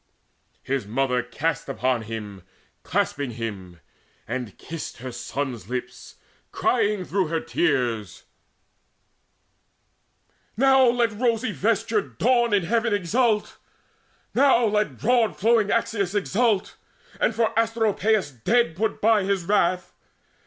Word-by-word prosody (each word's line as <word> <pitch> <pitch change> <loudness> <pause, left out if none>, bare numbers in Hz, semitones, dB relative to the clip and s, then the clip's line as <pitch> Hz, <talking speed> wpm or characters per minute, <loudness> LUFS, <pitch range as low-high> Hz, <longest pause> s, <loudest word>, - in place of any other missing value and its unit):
His 135 -6 -2
mother 125 +2 0
cast 145 +5 -3
her - - -5
on 130 -3 +2
him, 105 -3 -7 0.4
clasping 140 -4 -1
him, 95 -7 -6 0.5
And 125 -6 -5
kissed 165 -1 -7
her 130 +1 -7
son's 120 -3 -5
lips, 125 0 -6 0.4
crying 205 -2 +1
through 190 -1 0
her 165 +1 -1
tears: 125 - -1 2.3
"Now 265 +1 +5
let 235 -1 +2
the - - -11
rosy 235 -1 +1
vestured 210 - -1
Dawn 240 0 +3
in 205 -3 +3
heaven 225 +4 +1
Exult! 210 +3 0 0.8
Now 260 -3 +4
let 210 -1 0
broad 235 -2 +2
flowing 225 0 +3
Axius 205 -4 0
Exult, 205 0 0 0.4
and 225 - +1
for 225 -1 +1
Asteropaeus 220 -4 +1
dead 160 - +1
Put 220 +5 -2
by 220 -1 +4
his 195 -2 0
wrath! 180 -1 +1
200 Hz, 115 wpm, -24 LUFS, -, 2.3 s, Now